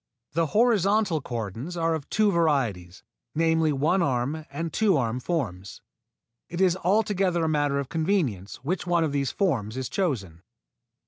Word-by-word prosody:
The 165 +2 +1
horizontal 205 -4 +2
cordons 120 - -5
are 165 0 +1
of 155 -3 -5
two 215 -1 +3
varieties, 125 - 0 0.3
namely 160 -1 +2
one 155 +7 +2
arm 140 +2 -1
and 160 +3 -4
two 205 -6 +3
arm 120 -1 -1
forms. 110 - -4 0.7
It 170 +1 -5
is 185 -2 +4
altogether 190 -2 +1
a - - +1
matter 145 -2 +1
of 140 -2 -2
convenience 155 - -1
which 180 +5 -2
one 175 -1 +2
of 155 - 0
these 140 -2 0
forms 125 - -1
is 130 -2 -3
chosen. 105 - -2
160 Hz, 150 wpm, -26 LUFS, 130-180 Hz, 0.7 s, is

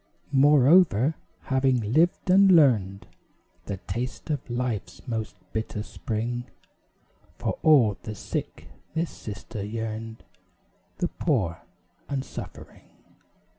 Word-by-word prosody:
Moreover, 145 - +5 0.3
having 130 -4 +1
lived, 165 +4 +2
and 190 +1 +6
learned 110 - +4 0.6
The 100 - -3
taste 120 - -5
of 145 -4 -3
Life's 120 -7 -3
most 110 -3 -3 0.2
bitter 110 -1 -3
spring, 120 +3 -4 0.9
For - - -3
all 125 -11 +5
the 110 -2 -6
sick - - -5 0.3
this 165 +1 -1
sister 105 -1 -7
yearned 110 +1 -5 0.7
The 175 - 0
poor 105 - -1 0.5
and 135 -2 -2
suffering. - - -10
120 Hz, 100 wpm, -26 LUFS, 110-145 Hz, 0.9 s, and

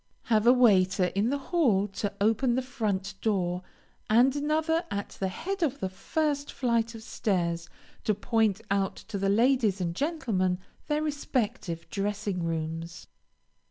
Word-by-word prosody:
Have 220 -1 +2
a - - +10
waiter 190 -7 +4
in 205 +4 +1
the 285 - +1
hall 265 - +2
to 200 +1 -3
open 225 +4 +2
the 260 - 0
front 215 -7 -2
door, 180 -4 0 0.5
and 245 +5 +5
another 315 +3 +1
at 200 0 -3
the 190 - 0
head 370 - -4
of 285 -4 0
the 190 - -2
first 285 +8 -1
flight 235 -2 0
of 220 - -9
stairs, 175 -8 -1 0.4
to 215 - +2
point 220 0 +1
out 195 -1 +1
to 210 -3 -6
the 195 0 +1
ladies 225 -2 +3
and 170 -2 -2
gentlemen 225 - 0 0.3
their 300 0 0
respective 245 - -2
dressing 200 -2 -2
rooms. 165 +1 -4
215 Hz, 150 wpm, -28 LUFS, 190-260 Hz, 0.5 s, a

